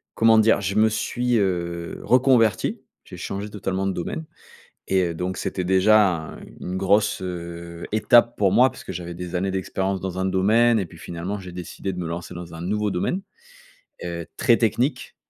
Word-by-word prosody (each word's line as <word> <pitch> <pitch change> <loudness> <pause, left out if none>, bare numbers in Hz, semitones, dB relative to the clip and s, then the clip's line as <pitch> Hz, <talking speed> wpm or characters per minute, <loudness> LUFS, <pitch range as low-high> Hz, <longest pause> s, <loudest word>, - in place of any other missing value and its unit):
comment 115 0 +5
dire? 110 -1 +4
Je 100 +1 -2
me 110 +1 +5
suis, 120 +2 0
heu, 85 -3 -2
reconverti. 125 -5 +3 0.2
J'ai - - -10
changé 100 +2 -5
totalement 95 -1 -2
de 95 - 0
domaine 155 - -4 0.6
et 95 -1 +2
heu, 85 - -5
donc, 90 +2 -3
c'était 90 - -3
déjà 100 +3 +5 0.2
un - - -11 0.2
une 90 +1 -4
grosse 100 +1 +2 0.7
étape 120 +2 +4
pour 100 -3 +2
moi 130 +2 +5
puisque - - -9
j'avais 85 0 -6
des 90 +1 -7
années 95 +2 0
d'expérience 95 0 -2
dans 95 -1 -4
un 95 - 0
domaine 110 +5 +3
et 95 - -2
puis, 85 0 -15
finalement, 90 +5 -5
j'ai 90 -2 -9
décidé 90 +2 -5
de 90 - -7
me 90 - -3
lancer 85 +2 -6
dans 85 -1 -8
un 80 - -7
nouveau 105 +3 -1
domaine, 140 - -1 0.8
heu, 85 -1 -4
très 115 - +4
technique. 120 +5 0
95 Hz, 180 wpm, -23 LUFS, 90-110 Hz, 0.8 s, comment